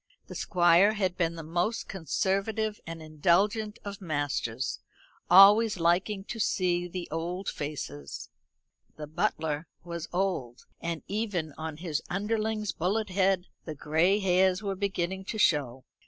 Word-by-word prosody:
The - - -10
Squire 175 +2 +4
had 190 -4 -1
been 170 -2 0
the 165 - -7
most 175 +8 -1
conservative 200 +5 -1
and 165 -1 -7
indulgent 195 +8 +1
of 200 0 -6
masters; 145 -6 -2 0.5
always 200 +3 +7
liking 185 +4 +1
to 225 +3 -7
see 175 -3 +1
the 180 0 -6
old 175 +4 -3
faces. 75 - -5 0.7
The 150 - -5
butler 160 -2 -2 0.2
was 170 -1 -6
old, 175 -10 -2 0.2
and 170 -1 -3
even 195 -7 -2
on 160 -1 -6
his 160 -3 -2
underling's 215 +1 -1
bullet 205 +5 -1
head 190 -1 +2 0.2
the 155 - -5
gray 160 +7 +2
hairs 190 0 +2
were 200 -1 -1
beginning 190 -1 -2
to 220 - -4
show. 135 - +1
Mrs. - - -61
180 Hz, 140 wpm, -28 LUFS, 160-200 Hz, 0.7 s, always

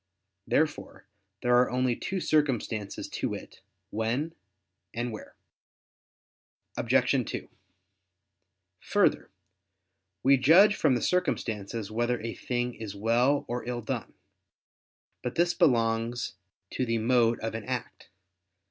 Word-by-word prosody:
Therefore 155 -1 -1 0.4
there 125 0 +4
are 125 0 +4
only 125 -1 +1
two 190 +9 -3
circumstances, 125 - 0
to - - -3
wit, - - -8 0.3
"when" 120 +9 -1 0.6
and 120 +1 -2
"where." 110 - -9 1.4
Obj. - - +2
2: - - -5 1.3
Further, - - +1 0.9
we 135 +1 +6
judge 175 +11 +6
from 130 - +3
the 120 - -2
circumstances 115 - -1
whether 120 +2 0
a 115 0 -4
thing 125 0 -2
is 110 -3 -7
well 120 +7 +2
or 120 0 -3
ill 120 -1 -3
done. - - -4 1.1
But 125 - -4
this 175 +1 +3
belongs 115 - +1 0.4
to - - -1
the 115 -2 0
mode 115 0 +3
of 115 0 -3
an 115 -1 -5
act. 125 -2 -5
120 Hz, 115 wpm, -28 LUFS, 115-130 Hz, 1.4 s, we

